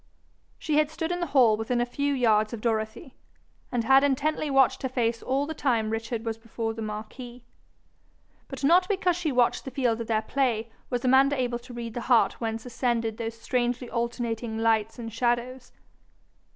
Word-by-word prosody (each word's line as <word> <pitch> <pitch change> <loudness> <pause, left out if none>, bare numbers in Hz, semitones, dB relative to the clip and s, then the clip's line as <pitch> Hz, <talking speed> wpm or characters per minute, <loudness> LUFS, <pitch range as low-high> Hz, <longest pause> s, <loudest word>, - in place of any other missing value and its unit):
She 300 -2 -1
had 305 -1 +2
stood 325 +1 -3
in 355 - -1
the 345 - -2
hall 250 -6 +5
within 225 +3 -1
a 240 - +2
few 285 +4 -1
yards 220 -3 +2
of 225 - -5
Dorothy, 220 +5 -2 0.6
and 240 -2 0
had 270 +4 +5
intently 290 +2 0
watched 270 -2 +3
her 260 - -2
face 235 -2 -1
all 270 +2 0
the 320 - -4
time 230 -7 0
Richard 225 +1 -3
was 225 0 -3
before 225 0 -4
the 225 - -7
marquis. 220 +3 -7 1.0
But 270 0 -8
not 350 +6 +5
because 375 -3 +1
she 340 -3 -1
watched 245 -2 +2
the - - -6
field 245 -3 0
of 230 - -5
their 220 -1 +1
play 230 -3 -1 0.2
was 245 0 -2
Amanda 270 +2 +4
able 240 -1 -1
to 245 +1 -12
read 230 -1 -5
the 240 - -4
heart 240 -1 +3
whence 225 0 -3
ascended 230 -2 -1
those 230 0 -5
strangely 245 +1 -1
alternating 235 -1 -2
lights 225 -1 +1
and 225 -2 -7
shadows. 240 +2 -1
240 Hz, 185 wpm, -27 LUFS, 225-265 Hz, 1.0 s, hall